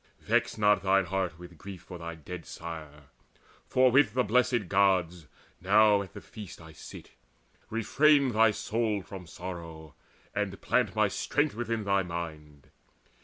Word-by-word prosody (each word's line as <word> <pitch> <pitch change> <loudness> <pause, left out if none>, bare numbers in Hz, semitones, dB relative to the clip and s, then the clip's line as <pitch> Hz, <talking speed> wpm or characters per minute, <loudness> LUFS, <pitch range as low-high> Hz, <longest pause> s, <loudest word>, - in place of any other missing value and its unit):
Vex 120 +2 0
not 105 -2 +3
thine 95 0 +3
heart 90 -2 -2
with 85 -2 -13
grief 95 0 -9
For 90 -2 -10
thy 85 0 -6
dead 85 +2 -9
sire; 75 -4 -9 0.6
for 130 0 +4
with 125 -4 +4
the 125 - +3
Blessed 120 -1 +2
Gods 90 -4 +2 0.3
Now 105 +2 +5
at 95 -3 -9
the - - -9
feast 105 -6 -10
I 80 -1 -12
sit. 75 - -12 0.6
Refrain 140 +5 +3
thy 110 0 +5
soul 105 -1 -1
From 90 -2 -10
sorrow, 85 -4 -8 0.4
and - - -2
plant - - 0
my - - +3
strength 145 0 0
within 115 -1 -3
thy 100 -1 +2
mind. 80 -5 -7
95 Hz, 150 wpm, -29 LUFS, 85-110 Hz, 0.6 s, Now